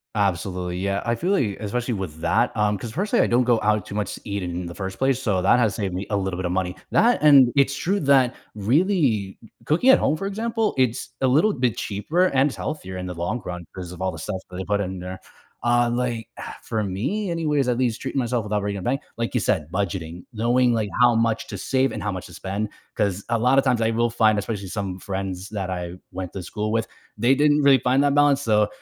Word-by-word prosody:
Absolutely, 90 Hz, -2 st, -1 dB
yeah, 100 Hz, +1 st, -1 dB
I 115 Hz, -, +2 dB
feel 180 Hz, +10 st, -1 dB
like, 110 Hz, -, +1 dB
especially 120 Hz, +3 st, -2 dB
with 85 Hz, -5 st, -6 dB
that, 85 Hz, -, +1 dB
um 105 Hz, -1 st, +1 dB
'cause, 110 Hz, +3 st, -7 dB
personally, 200 Hz, -, +1 dB
I -, -, +1 dB
don't 120 Hz, +1 st, +3 dB
go 120 Hz, -3 st, +3 dB
out 105 Hz, -1 st, +2 dB
too 100 Hz, -, -7 dB
much 105 Hz, -, -2 dB
to -, -, -13 dB
eat 100 Hz, -3 st, -3 dB
in 90 Hz, 0 st, -4 dB
the 85 Hz, -, -8 dB
first 95 Hz, -1 st, -5 dB
place, 135 Hz, -1 st, +2 dB
so 105 Hz, -8 st, 0 dB
that 100 Hz, +6 st, +4 dB
has 110 Hz, -5 st, +2 dB
saved 95 Hz, -4 st, -3 dB
me 95 Hz, -, -3 dB
a 100 Hz, -, +2 dB
little 95 Hz, -2 st, -2 dB
bit 95 Hz, -, -3 dB
of 90 Hz, -, -1 dB
money, 90 Hz, 0 st, -1 dB, 0.2 s
that 240 Hz, +3 st, +4 dB
and 135 Hz, -5 st, +7 dB
it's 140 Hz, -1 st, +3 dB
true 195 Hz, +8 st, 0 dB
that 135 Hz, -3 st, +4 dB, 0.2 s
really 135 Hz, -, +2 dB, 0.5 s
c 115 Hz, -, -16 dB, 0.2 s
cooking 175 Hz, -, +3 dB
at 265 Hz, -, +8 dB
home, 150 Hz, -, +1 dB
for 195 Hz, -, -4 dB
example, 225 Hz, +2 st, -1 dB
it's 125 Hz, -2 st, 0 dB
a 130 Hz, -, +3 dB
little 155 Hz, +12 st, +4 dB
bit 125 Hz, -4 st, 0 dB
cheaper 155 Hz, -, 0 dB
and 135 Hz, -2 st, +2 dB
is -, -, -8 dB
healthier 95 Hz, -12 st, -5 dB
in 90 Hz, 0 st, -5 dB
the 90 Hz, -, -5 dB
long 105 Hz, +8 st, -2 dB
run 90 Hz, -1 st, -6 dB
'cause 90 Hz, -2 st, -7 dB
of 90 Hz, 0 st, -10 dB
all 95 Hz, -, 0 dB
the 80 Hz, -, -9 dB
stuff 95 Hz, +4 st, -3 dB
that 90 Hz, -, -7 dB
they 95 Hz, -, -3 dB
put 100 Hz, +1 st, 0 dB
in 95 Hz, -1 st, -4 dB
there, 90 Hz, +1 st, -7 dB, 0.4 s
uh, 120 Hz, 0 st, +3 dB
like, 120 Hz, -2 st, -2 dB, 0.3 s
for 110 Hz, -2 st, -2 dB
me, 140 Hz, -, -2 dB
anyways, 150 Hz, -5 st, 0 dB
at 120 Hz, -, +1 dB
least 120 Hz, -3 st, 0 dB
treating 140 Hz, -, -2 dB
myself 120 Hz, -2 st, 0 dB
without 105 Hz, 0 st, -1 dB
breaking 100 Hz, -1 st, -3 dB
a -, -, -7 dB
bank, 130 Hz, +3 st, 0 dB, 0.2 s
like 115 Hz, 0 st, -2 dB
you 125 Hz, -, +2 dB
said, 95 Hz, -8 st, 0 dB
budgeting, 90 Hz, -3 st, -3 dB
knowing, 120 Hz, +2 st, +2 dB
like, 110 Hz, -3 st, -1 dB
how 120 Hz, -1 st, +6 dB
much 115 Hz, -1 st, 0 dB
to -, -, -6 dB
save 130 Hz, -1 st, +1 dB
and -, -, -5 dB
how 105 Hz, -, -1 dB
much 95 Hz, -2 st, -6 dB
to 90 Hz, -, -14 dB
spend, 100 Hz, +5 st, -3 dB, 0.3 s
'cause 100 Hz, -1 st, -1 dB
a 115 Hz, -, +1 dB
lot 125 Hz, +4 st, +3 dB
of 135 Hz, -, +5 dB
times, 125 Hz, -3 st, +2 dB
I 110 Hz, -, +2 dB
will 120 Hz, +1 st, +1 dB
find- 110 Hz, -2 st, +3 dB
especially 105 Hz, -1 st, -3 dB
some 95 Hz, -1 st, -4 dB
friends 95 Hz, -1 st, -4 dB
that 100 Hz, -3 st, -4 dB
I 90 Hz, -1 st, -4 dB, 0.2 s
went 90 Hz, -1 st, -6 dB
to 95 Hz, -, -5 dB
school 105 Hz, +3 st, -3 dB
with- 115 Hz, 0 st, +1 dB, 0.3 s
they 120 Hz, +5 st, +4 dB
didn't 150 Hz, +1 st, +3 dB
really 140 Hz, -2 st, +6 dB
find 130 Hz, +4 st, +2 dB
that 145 Hz, -1 st, +3 dB
balance, 145 Hz, -1 st, +4 dB
so, 105 Hz, -5 st, +3 dB
110 Hz, 250 wpm, -23 LUFS, 95-130 Hz, 0.5 s, at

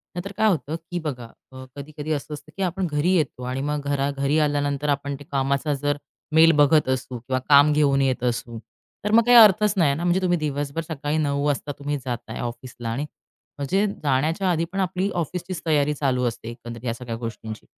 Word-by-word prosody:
नाहीतर 180 Hz, +3 st, -5 dB
काय 220 Hz, -, +3 dB
होतं 160 Hz, -4 st, -1 dB
की, 170 Hz, +2 st, -6 dB
बघा, 135 Hz, -7 st, -5 dB, 0.2 s
अ, 130 Hz, 0 st, -10 dB
कधी-कधी 150 Hz, +2 st, -6 dB
असं 150 Hz, +1 st, -4 dB
असतं, 155 Hz, +1 st, -10 dB
की 195 Hz, -, -1 dB
आपण 185 Hz, 0 st, -1 dB
घरी 150 Hz, +5 st, +1 dB
येतो 150 Hz, -6 st, -1 dB
आणि 130 Hz, +2 st, -3 dB
मग 145 Hz, +1 st, -2 dB
घरा 140 Hz, 0 st, 0 dB
घरी 140 Hz, +2 st, 0 dB
आल्यानंतर 145 Hz, -1 st, 0 dB
आपण 140 Hz, 0 st, -1 dB
ते -, -, -10 dB
कामाचा 140 Hz, +2 st, 0 dB
जर 145 Hz, +1 st, -1 dB, 0.4 s
मेल 165 Hz, +1 st, +7 dB
बघत 150 Hz, -1 st, +4 dB
असू 130 Hz, -1 st, -2 dB
किंवा 130 Hz, +2 st, -2 dB
काम 145 Hz, +1 st, +7 dB
घेऊन 140 Hz, -2 st, +3 dB
येत 130 Hz, -2 st, 0 dB
असू, 120 Hz, -1 st, -2 dB, 0.5 s
तर 210 Hz, -, -1 dB
मग 230 Hz, +2 st, +6 dB
काही 245 Hz, 0 st, +7 dB
अर्थच 210 Hz, -2 st, +7 dB
नाही 155 Hz, -6 st, +4 dB
ना. 165 Hz, -, -4 dB
म्हणजे 175 Hz, +2 st, +2 dB
तुम्ही 175 Hz, -1 st, +2 dB
दिवसभर 145 Hz, 0 st, -2 dB
सकाळी 150 Hz, -1 st, -2 dB
9 140 Hz, -2 st, 0 dB
वाजता 145 Hz, 0 st, -1 dB, 0.3 s
जाताय 120 Hz, -2 st, -5 dB
ऑफिसला 120 Hz, 0 st, -6 dB
आणि 130 Hz, +6 st, -2 dB, 0.5 s
म्हणजे 190 Hz, +9 st, +1 dB, 0.2 s
जाण्याच्या 155 Hz, +7 st, +1 dB
आधी 165 Hz, 0 st, 0 dB
पण 195 Hz, -, -3 dB
आपली 185 Hz, +1 st, 0 dB
ऑफिसचीच 175 Hz, +2 st, -4 dB
तयारी 150 Hz, -2 st, +2 dB
चालू 130 Hz, -3 st, 0 dB
असते, 115 Hz, -1 st, -5 dB
एकंदरीत 120 Hz, 0 st, -9 dB
या 115 Hz, -, 0 dB
सगळ्या 120 Hz, -1 st, -6 dB
गोष्टींची. 115 Hz, -2 st, -7 dB
145 Hz, 195 wpm, -24 LUFS, 130-165 Hz, 0.5 s, मेल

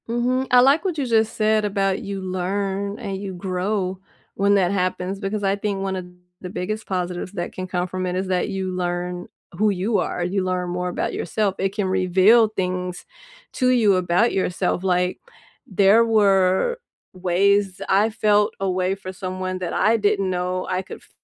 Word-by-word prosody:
Mhm, 250 Hz, +3 st, 0 dB
I 250 Hz, 0 st, +7 dB
like 275 Hz, +5 st, +4 dB
what 365 Hz, -5 st, -2 dB
you 280 Hz, -, -1 dB
just 225 Hz, -2 st, +2 dB
said 215 Hz, 0 st, +2 dB
about, 195 Hz, -2 st, 0 dB
"You 195 Hz, -1 st, -5 dB
learn 195 Hz, +2 st, -2 dB
and 195 Hz, -1 st, -4 dB
you 195 Hz, -1 st, -6 dB
grow 185 Hz, +1 st, -2 dB, 0.3 s
when 200 Hz, +1 st, +2 dB
that 185 Hz, -2 st, +2 dB
happens," 185 Hz, 0 st, -1 dB
because 205 Hz, +1 st, -3 dB
I 195 Hz, 0 st, +2 dB
think 200 Hz, -1 st, -3 dB
one 195 Hz, -1 st, -2 dB
of 185 Hz, -1 st, -5 dB, 0.4 s
the 180 Hz, -, -6 dB
biggest 215 Hz, +4 st, -4 dB
positives 180 Hz, 0 st, -3 dB
that 175 Hz, -3 st, -4 dB
can 185 Hz, 0 st, -5 dB
come 180 Hz, 0 st, -2 dB
from 185 Hz, +1 st, -4 dB
it 180 Hz, -, -2 dB
is 190 Hz, +1 st, -2 dB
that 185 Hz, +1 st, 0 dB
you 190 Hz, -1 st, -3 dB
learn 180 Hz, 0 st, -3 dB, 0.3 s
who 215 Hz, +2 st, +3 dB
you 200 Hz, +3 st, 0 dB
are, 175 Hz, -, -2 dB
you 185 Hz, +2 st, -1 dB
learn 180 Hz, -1 st, -2 dB
more 180 Hz, 0 st, -2 dB
about 175 Hz, -, -2 dB
yourself, 200 Hz, +2 st, -1 dB
it 195 Hz, +1 st, -1 dB
can 205 Hz, -2 st, 0 dB
reveal 190 Hz, +5 st, +4 dB
things 180 Hz, -3 st, -3 dB, 0.5 s
to 255 Hz, -2 st, +1 dB
you 225 Hz, -6 st, +4 dB
about 180 Hz, +5 st, +2 dB
yourself, 180 Hz, -1 st, 0 dB
Like, 180 Hz, -1 st, +1 dB, 0.5 s
there 200 Hz, +3 st, +5 dB
were 200 Hz, -, +3 dB, 0.3 s
ways 190 Hz, +1 st, +1 dB
I 205 Hz, +3 st, +4 dB
felt 210 Hz, -1 st, +2 dB
a 195 Hz, -, 0 dB
way 185 Hz, +1 st, 0 dB
for 190 Hz, -1 st, -8 dB
someone 185 Hz, 0 st, -4 dB
that 180 Hz, -2 st, -4 dB
I 225 Hz, +2 st, +3 dB
didn't 200 Hz, -2 st, +1 dB
know 180 Hz, 0 st, -2 dB
I 185 Hz, 0 st, 0 dB
could 190 Hz, -, -9 dB
f -, -, -23 dB
190 Hz, 185 wpm, -22 LUFS, 185-205 Hz, 0.5 s, I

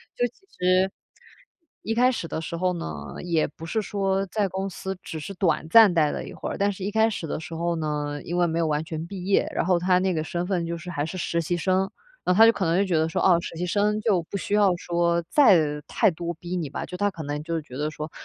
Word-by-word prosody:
就 245 Hz, -, +1 dB
其 240 Hz, -, -18 dB, 0.3 s
实， 185 Hz, +1 st, +3 dB, 0.9 s
一 225 Hz, -, -1 dB
开 250 Hz, +3 st, +4 dB
始 175 Hz, -9 st, -4 dB
的 160 Hz, -, -4 dB
时 170 Hz, +1 st, -5 dB
候 180 Hz, +1 st, +1 dB
呢， 75 Hz, -, -6 dB
也 170 Hz, -3 st, +1 dB
不 160 Hz, +2 st, -11 dB
是 215 Hz, +7 st, -1 dB
说 195 Hz, -1 st, -1 dB
在 205 Hz, +1 st, 0 dB
公 190 Hz, +1 st, -3 dB
司 190 Hz, +1 st, -5 dB
只 160 Hz, -, -6 dB
是 175 Hz, +6 st, -6 dB
短 160 Hz, -4 st, 0 dB
暂 220 Hz, -1 st, +8 dB
待 155 Hz, -3 st, +3 dB
了 -, -, -4 dB
一 -, -, -9 dB
会 -, -, -5 dB
儿， -, -, -4 dB
但 200 Hz, +1 st, +2 dB
是 190 Hz, -1 st, -7 dB
一 200 Hz, -, -1 dB
开 220 Hz, +1 st, +3 dB
始 175 Hz, -6 st, -4 dB
的 -, -, -3 dB
时 165 Hz, 0 st, -8 dB
候 170 Hz, +1 st, -1 dB
呢， 150 Hz, -2 st, -2 dB
因 175 Hz, +1 st, -3 dB
为 175 Hz, -, +3 dB
没 165 Hz, 0 st, -2 dB
有 165 Hz, -, +2 dB
完 150 Hz, 0 st, 0 dB
全 160 Hz, 0 st, -5 dB
毕 185 Hz, -1 st, -7 dB
业， 195 Hz, 0 st, +2 dB
然 -, -, +1 dB
后 180 Hz, -1 st, +3 dB
它 180 Hz, +1 st, +3 dB
那 185 Hz, 0 st, +1 dB
个 155 Hz, -2 st, -1 dB
身 175 Hz, +2 st, -3 dB
份 180 Hz, -3 st, 0 dB
就 170 Hz, 0 st, -3 dB
是 175 Hz, +2 st, -9 dB
还 145 Hz, -4 st, -2 dB
是 175 Hz, +4 st, -6 dB
实 170 Hz, -1 st, -1 dB
习 175 Hz, +2 st, -1 dB
生， 185 Hz, +2 st, +1 dB, 0.3 s
然 180 Hz, -, +2 dB
后 -, -, -1 dB
他 225 Hz, -, +10 dB
就 230 Hz, -, +7 dB
可 205 Hz, -, -3 dB
能 165 Hz, +1 st, +2 dB
就 200 Hz, -, +3 dB
觉 180 Hz, -4 st, +1 dB
得 160 Hz, -, 0 dB
说： -, -, -1 dB
“哦， 185 Hz, -, +6 dB
实 -, -, -7 dB
习 180 Hz, -, -2 dB
生 210 Hz, +3 st, +1 dB
就 205 Hz, -6 st, +2 dB
不 200 Hz, -, -3 dB
需 200 Hz, -, -4 dB
要 205 Hz, -3 st, +4 dB
说 170 Hz, 0 st, 0 dB
再 160 Hz, -, +4 dB
太 -, -, +3 dB
多 170 Hz, +1 st, -4 dB
逼 175 Hz, +2 st, -6 dB
你 165 Hz, -5 st, -2 dB
吧”， -, -, -5 dB
就 180 Hz, -, -8 dB
他 205 Hz, +2 st, +2 dB
可 165 Hz, -4 st, -7 dB
能 145 Hz, +1 st, -3 dB
就 165 Hz, 0 st, -2 dB
觉 135 Hz, -4 st, -12 dB
得 150 Hz, +1 st, -1 dB
说： 155 Hz, 0 st, -6 dB
175 Hz, 295 characters per minute, -25 LUFS, 160-195 Hz, 0.9 s, 他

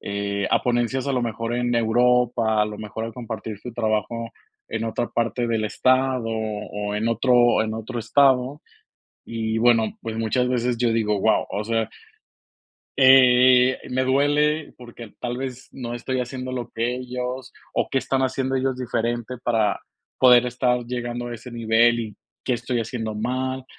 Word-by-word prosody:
eh, 100 Hz, 0 st, -2 dB
a -, -, +3 dB
ponencias 125 Hz, +2 st, 0 dB
a 140 Hz, -, 0 dB
lo 125 Hz, -, 0 dB
mejor 115 Hz, 0 st, -3 dB
en 120 Hz, 0 st, 0 dB
Europa, 115 Hz, -1 st, +2 dB
a -, -, +4 dB
lo 105 Hz, 0 st, -6 dB
mejor 110 Hz, +1 st, -6 dB
a 115 Hz, -, -6 dB
compartir 110 Hz, -3 st, -7 dB
su 125 Hz, -, -8 dB
trabajo 115 Hz, 0 st, -2 dB, 0.4 s
en -, -, -4 dB
otra 115 Hz, +1 st, -2 dB
parte 120 Hz, +1 st, -1 dB
del 115 Hz, -2 st, 0 dB
estado, 130 Hz, +2 st, +1 dB
o 105 Hz, -2 st, -4 dB
en 110 Hz, +2 st, -1 dB
otro 120 Hz, 0 st, +3 dB
en 110 Hz, -, -3 dB
otro 115 Hz, +2 st, -5 dB
estado. 135 Hz, +3 st, +2 dB, 0.6 s
Y 110 Hz, -1 st, -3 dB
bueno, 115 Hz, -2 st, +3 dB
pues, 115 Hz, -1 st, -5 dB
muchas 115 Hz, +3 st, 0 dB
veces 125 Hz, -1 st, 0 dB
yo 120 Hz, -1 st, +2 dB
digo, 105 Hz, -2 st, +1 dB
guau, -, -, +2 dB
o 105 Hz, -, -2 dB
sea, 115 Hz, 0 st, 0 dB, 1.1 s
eh, 130 Hz, -1 st, +6 dB
me 130 Hz, +1 st, 0 dB
duele 145 Hz, +3 st, +1 dB
porque 120 Hz, -1 st, -11 dB
al 105 Hz, -, -16 dB
tal 120 Hz, 0 st, -4 dB
vez 130 Hz, -1 st, -6 dB
no 120 Hz, -3 st, -6 dB
estoy 130 Hz, +2 st, -2 dB
haciendo 130 Hz, +1 st, -5 dB
lo 120 Hz, -2 st, -4 dB
que 115 Hz, +2 st, -1 dB
ellos, 125 Hz, 0 st, -5 dB, 0.2 s
o, -, -, 0 dB
¿qué -, -, -2 dB
están 135 Hz, 0 st, -1 dB
haciendo 130 Hz, 0 st, -1 dB
ellos 130 Hz, 0 st, 0 dB
diferente 120 Hz, 0 st, -2 dB
para 110 Hz, -4 st, +1 dB, 0.4 s
poder 125 Hz, -1 st, +7 dB
estar 125 Hz, 0 st, 0 dB
llegando 120 Hz, 0 st, -4 dB
a 120 Hz, -, -5 dB
ese 120 Hz, +2 st, -10 dB
nivel? 115 Hz, 0 st, +3 dB
Y, 110 Hz, -3 st, -7 dB, 0.3 s
¿qué 130 Hz, -, 0 dB
estoy 120 Hz, 0 st, -1 dB
haciendo 110 Hz, -1 st, -4 dB
mal? 130 Hz, +4 st, -2 dB
120 Hz, 170 wpm, -23 LUFS, 115-125 Hz, 1.1 s, poder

